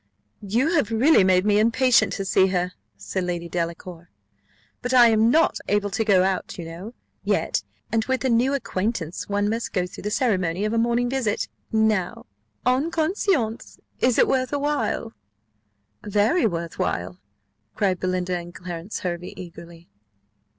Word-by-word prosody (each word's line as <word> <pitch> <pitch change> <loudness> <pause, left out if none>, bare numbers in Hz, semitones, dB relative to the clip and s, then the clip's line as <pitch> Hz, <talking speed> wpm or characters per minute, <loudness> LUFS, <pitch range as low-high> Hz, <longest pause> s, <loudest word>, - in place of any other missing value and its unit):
"You 235 - 0
have 295 -10 +2
really 235 +1 +4
made 185 0 +3
me 210 0 +3
impatient 235 +3 +3
to 195 - -3
see 190 0 +3
her," 180 -1 -1 0.3
said 100 - -3
Lady 175 -1 -3
Delacour: 170 0 -5 0.7
"but 250 +1 -1
I 240 -2 +8
am 220 0 +4
not 320 +6 +3
able 205 0 0
to 220 +4 0
go 195 -4 +4
out, 190 -1 -2
you 170 - -6
know, 180 +9 -9 0.3
yet; - - 0 0.3
and 225 -1 +1
with 260 0 -1
a - - +2
new 250 +4 +2
acquaintance, 190 - -3
one 205 0 +1
must 225 +2 -2
go 180 -3 +1
through 180 - -10
the 210 - -3
ceremony 195 -6 0
of 215 - -1
a 230 - +2
morning 235 +1 +1
visit. 240 -5 -1 0.2
Now, 220 -4 0 0.4
en 260 +6 +2
conscience, 320 - -1 0.2
is 250 -1 +2
it - - +5
worth 255 0 0
while?" 285 -5 -1 0.9
"Very 210 - +2
well 170 -4 -2
worth 165 - -11
while," 90 +1 -2 0.6
cried 195 -4 0
Belinda 185 0 -1
and 175 0 -7
Clarence 175 +2 -6
Hervey, 175 0 -4
eagerly. 170 -1 -11
205 Hz, 160 wpm, -24 LUFS, 180-240 Hz, 0.9 s, I